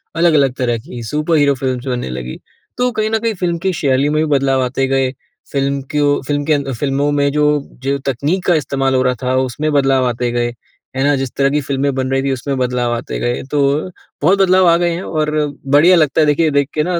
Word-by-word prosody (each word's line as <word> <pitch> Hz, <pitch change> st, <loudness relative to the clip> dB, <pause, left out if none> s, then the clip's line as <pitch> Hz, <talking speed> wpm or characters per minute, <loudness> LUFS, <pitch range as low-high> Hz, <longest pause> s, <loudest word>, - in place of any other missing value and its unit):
अलग-अलग 155 Hz, -6 st, +3 dB
तरह 120 Hz, -2 st, 0 dB
की 120 Hz, 0 st, -9 dB
सुपर 150 Hz, +7 st, -1 dB
हीरो 140 Hz, -1 st, +3 dB
फ़िल्म्स 130 Hz, -1 st, -3 dB
बनने 125 Hz, -, -2 dB
लगी। 65 Hz, 0 st, -6 dB, 0.4 s
तो 250 Hz, 0 st, +1 dB
कहीं 215 Hz, 0 st, -1 dB
न 225 Hz, -, 0 dB
कहीं 230 Hz, 0 st, -1 dB
फ़िल्म 175 Hz, -2 st, -1 dB
की 190 Hz, +1 st, -1 dB
शैली 140 Hz, -1 st, +1 dB
में 155 Hz, +1 st, +1 dB
भी -, -, +1 dB
बदलाव 135 Hz, -1 st, +1 dB
आते 135 Hz, +1 st, -1 dB
गए, 135 Hz, -1 st, +1 dB, 0.4 s
फ़िल्म 140 Hz, -1 st, -1 dB
क्यों 145 Hz, -1 st, +1 dB
फ़िल्म 145 Hz, -1 st, -1 dB
के 155 Hz, -, +2 dB
अं 140 Hz, -2 st, -1 dB
फ़िल्मों 140 Hz, +3 st, -1 dB
में 140 Hz, -1 st, +1 dB
जो, 150 Hz, 0 st, +2 dB, 0.2 s
जो 140 Hz, +1 st, 0 dB
तकनीक 145 Hz, +8 st, -1 dB
का 175 Hz, -, +4 dB
इस्तेमाल 135 Hz, -3 st, 0 dB
हो 130 Hz, -, +3 dB
रहा 125 Hz, 0 st, +1 dB
था 130 Hz, +1 st, 0 dB
उसमें 130 Hz, +4 st, -1 dB
बदलाव 135 Hz, -2 st, +2 dB
आते 120 Hz, 0 st, -1 dB
गए। 120 Hz, 0 st, -1 dB, 0.4 s
है 135 Hz, -, 0 dB
ना? 145 Hz, 0 st, +3 dB
जिस 135 Hz, -2 st, -3 dB
तरह 140 Hz, 0 st, +3 dB
की 150 Hz, +1 st, +1 dB
फ़िल्में 140 Hz, 0 st, -1 dB
बन 130 Hz, 0 st, -1 dB
रही 135 Hz, 0 st, +1 dB
थी, 135 Hz, -, 0 dB
उसमें 135 Hz, +2 st, -3 dB
बदलाव 125 Hz, -1 st, 0 dB
आते 115 Hz, -, -5 dB
गए। 120 Hz, 0 st, -1 dB
तो 145 Hz, -, 0 dB, 0.6 s
बहुत 190 Hz, +6 st, +3 dB
बदलाव 185 Hz, -1 st, +4 dB
आ 170 Hz, -, +6 dB
गए 175 Hz, 0 st, +1 dB
हैं 170 Hz, +2 st, -3 dB
और 155 Hz, -1 st, -1 dB, 0.5 s
बढ़िया 175 Hz, +5 st, +6 dB
लगता 155 Hz, -1 st, +2 dB
है -, -, +4 dB
देखिए 155 Hz, +1 st, +2 dB
देख 140 Hz, 0 st, +1 dB
के 150 Hz, -, 0 dB
ना 175 Hz, -1 st, -1 dB
140 Hz, 235 wpm, -16 LUFS, 130-155 Hz, 0.6 s, आ